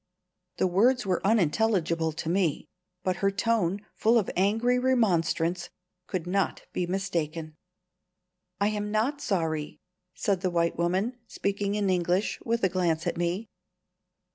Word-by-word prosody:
The - - +2
words 225 +7 +3
were 185 -2 0
unintelligible 180 -4 +2
to 160 +1 -6
me, 170 -3 0 0.4
but 185 -1 0
her 195 - +2
tone, 205 -2 0
full 230 +2 +3
of 215 - +1
angry 225 +7 +2
remonstrance, 180 -8 +1 0.4
could 185 -4 -3
not 190 +2 -1
be 180 - -1
mistaken. 170 -4 -2 1.0
"I 200 +1 +3
am 210 -1 -2
not 235 +8 0
sorry," 160 - -1 0.4
said 195 -3 0
the 185 - +1
white 170 -1 +1
woman, 190 +9 0
speaking 200 0 -2
in 205 -1 0
English, 180 +3 +1
with 230 -1 -1
a - - +6
glance 170 -3 0
at - - -1
me. 175 +6 -1
190 Hz, 140 wpm, -28 LUFS, 170-215 Hz, 1.0 s, a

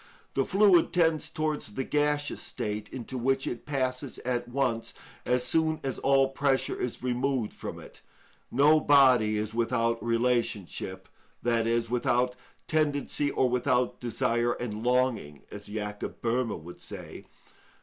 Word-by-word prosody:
The 135 - +1
fluid 195 -3 +4
tends 165 -3 +2
towards 155 -9 -3
the 135 - -1
gaseous 145 +1 0
state, 105 0 -4
into 130 0 -6
which 135 +2 +1
it 120 - -5
passes 130 -2 -2
at 120 -1 -1
once 120 -3 -1 0.3
as 125 0 +2
soon 160 +2 +1
as 135 -1 -3
all 135 0 +3
pressure 135 0 0
is 125 0 -4
removed 125 -2 0
from - - -7
it. - - -14 0.5
No 150 +3 +5
body 130 -8 +5
is 105 +1 -3
without 115 0 0
relationship, 115 -6 -1 0.4
i.e., 115 0 +2
without 125 +1 +1 0.3
tendency 145 -2 0
or 130 - +2
without 125 0 +1
desire 120 0 0
and 110 -2 -5
longing, 125 - 0
as 105 0 -8
Jacob 105 0 -5
Böhme 115 -4 -1
would 90 +1 -11
say. - - -9
125 Hz, 135 wpm, -28 LUFS, 115-140 Hz, 0.5 s, No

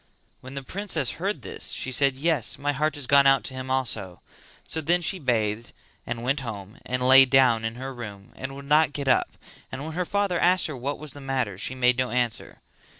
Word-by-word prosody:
When 130 +2 -11
the 140 - -5
princess 165 - -1
heard 190 - -2
this 95 - -4
she 130 - -3
said 135 +1 +2
"Yes, 145 -3 0
my 145 +1 -1
heart 150 +2 -1
has 145 -2 -3
gone 140 +1 +5
out 135 -1 +4
to 130 - -5
him 130 0 -6
also;" 110 -9 -1 0.4
so 160 - -3
then 175 +4 +2
she 185 +2 -1
bathed 115 -5 -1 0.3
and 115 0 -4
went 135 +4 0
home 105 -5 -8
and 125 0 -1
lay 135 +1 +10
down 125 -4 +4
in 115 0 -3
her 135 +2 -6
room 105 -5 -9
and 135 +1 -6
would 140 0 -9
not 150 0 +3
get 140 -2 -4
up, 130 - +2 0.3
and 135 - -6
when 160 +1 -6
her 180 +3 -1
father 200 -2 0
asked 180 +1 +3
her 155 - -4
what 135 +3 -4
was 150 -3 -5
the 145 - -9
matter, 130 -7 -2
she 120 +7 -4
made 125 -1 +2
no 130 -1 0
answer. 120 -2 -2
130 Hz, 220 wpm, -25 LUFS, 120-145 Hz, 0.4 s, lay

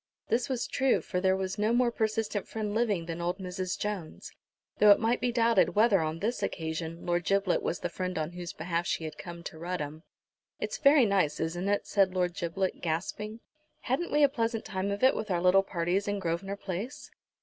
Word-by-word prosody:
This 240 +3 +1
was 255 -3 -1
true, 265 -1 +2
for 180 - -3
there 190 0 +3
was 190 +2 -3
no 215 +2 +2
more 240 0 +3
persistent 220 -2 -1
friend 215 -2 -3
living 210 -7 +1
than 165 0 -5
old 175 +1 -1
Mrs. 185 -1 -4
Jones, 200 -6 -5 0.5
though 210 - +7
it 205 - +8
might 230 +2 +1
be 245 - +1
doubted 230 -4 +3
whether, 210 -2 +5
on 155 0 -2
this 220 +8 -2
occasion, 160 +1 -4
Lord 175 0 +1
Giblet 195 0 +2
was 175 - -2
the - - -1
friend 185 0 -4
on 155 +1 -2
whose 175 -1 -6
behalf 170 +2 -2
she - - -1
had 155 - -6
come 170 -1 -8
to 160 -3 -8
Rudham. 160 -3 -4 0.6
"It's - - -3
very 280 -3 +6
nice, 190 -8 +1
isn't 175 +4 -2
it?" 205 - +1
said 195 -2 +2
Lord 180 -1 +1
Giblet, 185 +1 -2
gasping. 210 +7 -3 0.4
"Hadn't 290 +8 -1
we 295 - +4
a - - +8
pleasant 230 -4 -1
time 190 +1 -2
of 200 +3 -3
it 260 - +6
with 215 - -4
our 180 -2 +1
little 185 +2 +5
parties 185 +1 -1
in 205 0 0
Grosvenor 190 +2 -2
Place?" 200 +8 -6
190 Hz, 205 wpm, -29 LUFS, 175-220 Hz, 0.6 s, it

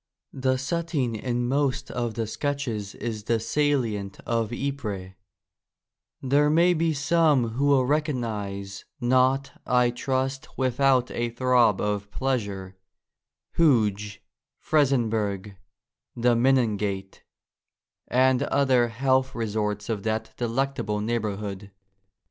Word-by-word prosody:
The 130 0 0
setting 140 -3 -1
in 120 +2 -2
most 135 0 0
of 120 -2 -3
the 115 - -1
sketches 115 -5 -3
is 110 -3 -5
the 115 0 +1
salient 115 -6 -1
of 115 -1 -1
Ypres: 115 -9 -4 1.1
there 145 +3 +3
may 170 +3 +4
be 165 -1 +1
some 150 -4 +2
who 130 +6 0
will 135 -3 +4
recognise 110 -10 -2
— - - -61
not, 130 +2 +2
I 125 -1 +3
trust, 130 +2 -3
without 130 0 +2
a 120 0 -1
throb 120 -3 +3
of 105 -1 -2
pleasure 100 -7 -3 0.4
— - - -65
Hooge, 105 -10 +2 0.3
Frizenburg, 110 -9 0 0.6
the 120 0 +3
Menin 120 -3 +3
gate, 95 -1 -4 0.9
and 130 +1 +3
other 135 -4 +3
health 130 +3 +1
resorts 105 -2 -2
of 110 -3 -2
that 110 +1 -2
de 120 - -2
lectable 115 -4 -1
neighbourhood. 105 -3 -3
120 Hz, 115 wpm, -25 LUFS, 105-135 Hz, 1.1 s, may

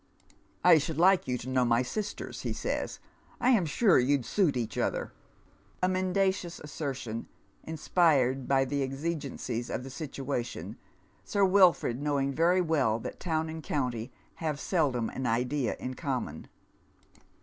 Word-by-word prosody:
" - - -35
I 175 -3 +8
should 150 +1 -3
like 185 +2 +4
you 125 -1 0
to 125 - -9
know 130 -1 +2
my 120 0 +3
sisters," 205 +10 -5
he - - -2
says, - - -3 0.2
" - - -30
I 250 +2 +4
am 200 -9 +3
sure 190 - +4
you'd 130 0 +2
suit 180 -10 +2
each 115 -3 -3
other," - - -1 0.3
— - - -23
a - - +5
mendacious 185 -1 0
assertion 135 -6 -5 0.4
inspired 150 -5 +2
by 135 -1 +3
the 140 +1 -1
exigencies 135 -4 -3
of - - -3
the 135 - -8
situation, 135 -4 -4 0.5
Sir 200 -1 +2
Wilford 185 -9 +4
knowing 140 -2 0
very 175 +5 +3
well 145 -10 +2
that 115 - -7
town 160 -2 -1
and 160 0 -6
count}' 125 -6 -2 0.3
have 155 -3 -2
seldom 140 - +1
an 130 -1 -3
idea 125 +4 0
in 130 - -4
common. 130 - -4
145 Hz, 155 wpm, -29 LUFS, 125-170 Hz, 0.5 s, I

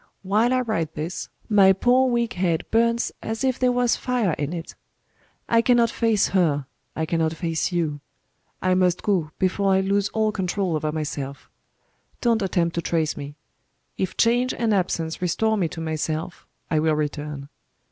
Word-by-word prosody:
While 215 +5 +2
I 255 0 +2
write 165 -10 -2
this, 160 +4 -4 0.2
my 195 -3 +6
poor 250 +6 +3
weak 235 -1 0
head 175 -3 0
burns 230 +1 +2
as 225 +3 -4
if 260 -1 +1
there 255 -1 +3
was 245 -1 +2
fire 245 -7 0
in 145 0 -3
it. 170 -1 -6 0.7
I 230 0 +4
cannot 235 -1 +3
face 225 -3 +2
her, 155 -7 +1 0.3
I 160 - -1
cannot 160 0 0
face 165 0 -1
you 155 -5 -1 0.6
I 185 0 +3
must 180 -1 +2
go, 180 -7 +1
before 195 +1 +1
I 190 - +3
lose 200 +1 +1
all 220 -1 +1
control 190 -2 -1
over 155 0 -1
myself. 145 -3 -5 0.7
Don't 230 -2 +2
attempt 175 -3 0
to 170 - -1
trace 160 -2 0
me. 145 0 -7 0.6
If 190 - -3
change 245 +2 +2
and 230 -2 +1
absence 170 -4 -1
restore 220 +5 +1
me 185 -5 +1
to 165 - -8
myself 160 +1 -3 0.2
I 155 - +3
will 155 0 +2
return. 150 -1 -4
185 Hz, 165 wpm, -24 LUFS, 160-225 Hz, 0.7 s, my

